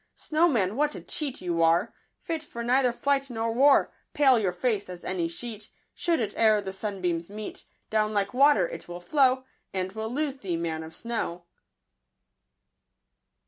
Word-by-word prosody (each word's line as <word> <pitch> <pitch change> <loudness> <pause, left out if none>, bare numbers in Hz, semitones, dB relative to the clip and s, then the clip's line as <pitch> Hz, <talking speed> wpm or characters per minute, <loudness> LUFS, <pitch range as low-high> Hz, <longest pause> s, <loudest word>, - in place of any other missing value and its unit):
Snowman, 275 - +1
what 295 +2 +1
a - - -7
cheat 290 -5 -1
you 170 -2 0
are; 165 +1 +3 0.3
Fit 330 -2 -3
for 235 -6 -7
neither 250 +1 +3
flight 275 +2 0
nor 225 -1 -2
war! 275 +4 +4 0.2
Pale 265 -5 +5
your 195 -4 +1
face 205 +2 -1
as 180 -1 -8
any 175 -3 -1
sheet: 215 +4 -6 0.2
Should 340 -1 +1
it 220 -4 -2
e'er 215 -2 +4
the 190 -2 -5
sunbeams 185 -4 -3
meet, 210 +1 -7 0.3
Down 215 -1 +2
like 200 -1 -1
water 260 -8 +5
it 165 - -8
will 175 0 -7
flow, 260 +6 +2 0.3
And 185 0 -1
we'll 220 +2 -4
lose 280 +2 -2
thee, 185 -9 -3
man 165 -1 -2
of 160 0 -10
snow 215 -7 -4
220 Hz, 165 wpm, -27 LUFS, 180-265 Hz, 0.3 s, Pale